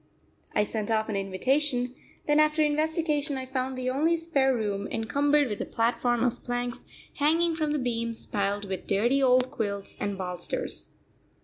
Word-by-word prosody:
I 210 - +4
sent 215 0 -2
off 220 0 +1
an 210 - -1
invitation; 250 +7 0 0.3
then 295 0 +3
after 305 0 +4
investigation 305 -1 +1
I 260 - -4
found 260 0 -3
the 255 0 -1
only 320 +6 +2
spare 290 -5 +2
room 205 -5 -1
encumbered 285 +5 +2
with 210 -3 -4
a - - -2
platform 240 +1 +1
of 245 -2 -1
planks 245 0 -3 0.3
hanging 325 +3 +3
from 310 -2 -1
the 300 - +1
beams, 230 -3 -2
piled 205 0 -1
with 190 -2 -5
dirty 240 +7 +2
old 255 -1 +4
quilts 200 -3 -4
and 200 -1 -2
bolsters. 180 -2 -4
250 Hz, 165 wpm, -28 LUFS, 220-295 Hz, 0.3 s, I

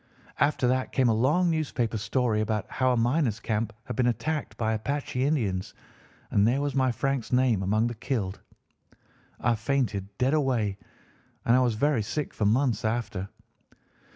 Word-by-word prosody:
After 140 -2 +2
that 130 +1 0
came 130 -2 +3
a - - +4
long 150 +10 +2
newspaper 130 -8 -1
story 110 0 0
about 110 0 -1
how 130 -1 +2
a 125 - +1
miners' 120 -1 +1
camp 110 -1 -1
had - - -6
been 125 -2 +2
attacked 150 +5 -2
by 110 -1 0
Apache 125 +3 -2
Indians, 110 -11 -1 0.6
and 100 +1 +4
there 125 +4 +2
was 145 -1 -1
my 130 -1 +2
Frank's 135 +1 -2
name 125 -5 +3
among 105 +4 +1
the 120 - -1
killed. 110 -5 -3 1.0
I 120 - +2
fainted 110 -4 -1
dead 130 +3 +2
away, 120 -9 +1 0.7
and 115 - +5
I - - +5
was 120 -3 +2
very 140 +1 +2
sick 140 +8 -3
for 105 - -1
months 120 +1 +2
after. 110 -4 -2
120 Hz, 165 wpm, -27 LUFS, 110-135 Hz, 1.0 s, and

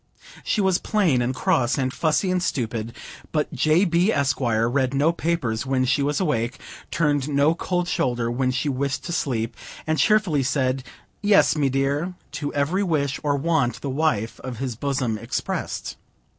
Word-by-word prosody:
She 210 - +1
was 190 -2 +2
plain 180 - +2
and 125 +2 -1
cross, 120 0 +1
and 130 -1 -1
fussy 165 +4 +1
and 180 -1 +1
stupid, 115 -7 -2 0.4
but 150 -1 -1
J. 155 +5 +3
B., 175 +4 +3
Esq., 140 -4 +1
read 120 +3 +1
no 150 +4 +3
papers 165 -10 -1
when 130 -1 +1
she 130 +3 +2
was 145 +1 0
awake, 120 - 0 0.3
turned 145 -3 +1
no 145 +2 +3
cold 175 0 -2
shoulder 120 -8 0
when 130 +1 0
she 130 +4 -1
wished 140 +1 -1
to 175 - -5
sleep, 115 -7 -1 0.3
and 155 0 0
cheerfully 210 -10 +3
said, 130 -1 0 0.4
"Yes, 205 -4 +4
me 145 -3 +2
dear," 140 +7 0 0.2
to 145 -1 -4
every 150 +7 +1
wish 150 -7 0
or 145 -1 +1
want 140 -6 0
the 140 - -3
wife 130 -7 0
of 130 -3 -6
his 130 -1 -3
bosom 130 -4 -1
expressed. - - -4
140 Hz, 170 wpm, -23 LUFS, 130-160 Hz, 0.4 s, Yes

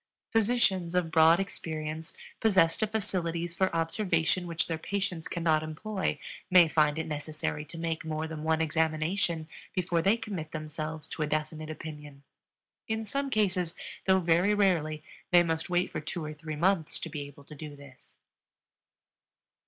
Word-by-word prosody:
Physicians 205 -6 +2
of 175 -3 +1
broad 160 +2 +6
experience, 160 -4 -4 0.2
possessed 190 -6 +4
of 220 - +2
facilities 175 -6 -1
for 190 +1 +1
observation 165 0 +1
which 165 -1 -1
their 165 -2 -3
patients 190 -2 -2
cannot 165 -3 +2
employ, 185 +6 -2 0.3
may 180 -3 +8
find 155 -1 +3
it 160 - -1
necessary 150 0 -3
to 165 - -10
make 165 -1 -2
more 160 0 -2
than 155 -1 -6
one 160 0 +2
examination 160 +1 0 0.3
before 175 -2 +1
they 200 +6 +4
commit 185 -9 -5
themselves 155 0 -5
to 160 - -5
a 150 - +1
definite 155 +1 -2
opinion; 150 -3 -8 0.6
in 220 0 -1
some 275 +6 -2
cases, 190 -7 +1 0.3
though 190 0 +5
very 175 +4 +3
rarely, 160 -7 +2 0.3
they 175 -1 +7
must 160 0 -1
wait 180 0 +1
for - - -3
two 160 +1 -4
or 155 - -5
three 155 0 -6
months 170 0 +1
to - - -5
be 155 -2 -5
able 140 0 -14
to 150 - -12
do 150 0 -8
this. 140 -2 -16
165 Hz, 160 wpm, -30 LUFS, 155-185 Hz, 0.6 s, may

